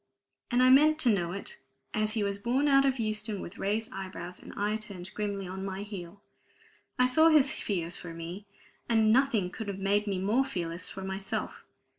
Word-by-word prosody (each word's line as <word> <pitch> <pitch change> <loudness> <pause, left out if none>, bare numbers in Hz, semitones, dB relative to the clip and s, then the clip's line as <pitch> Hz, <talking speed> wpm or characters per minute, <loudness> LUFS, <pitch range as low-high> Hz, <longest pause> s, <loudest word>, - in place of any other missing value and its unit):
And 245 0 +3
I 255 - +7
meant 305 +3 +6
to 245 - +4
know 175 -4 -1
it, 195 +2 -7 0.3
as 215 0 0
he 220 -2 0
was 200 0 -2
borne 255 +7 +1
out 275 -1 +5
of 270 -1 +2
Euston 215 -2 -2
with 175 - -8
raised 215 +3 -1
eyebrows, 185 -2 -7
and - - -10
I 210 +1 0
turned 200 -3 -7
grimly 200 -2 -3
on 190 +1 -5
my 195 0 -4
heel. 200 -1 -8 0.7
I 250 - +5
saw 315 +6 +5
his 295 -4 +5
fears 175 -4 -2
for 175 - -8
me; 170 +5 -7 0.4
and 220 -2 +4
nothing 235 -8 +2
could 220 - -6
have 200 -1 -3
made 200 +2 +1
me 195 -2 0
more 210 +8 +2
fearless 175 -9 -4
for 190 - -7
myself. 190 0 -4
205 Hz, 195 wpm, -29 LUFS, 190-235 Hz, 0.7 s, I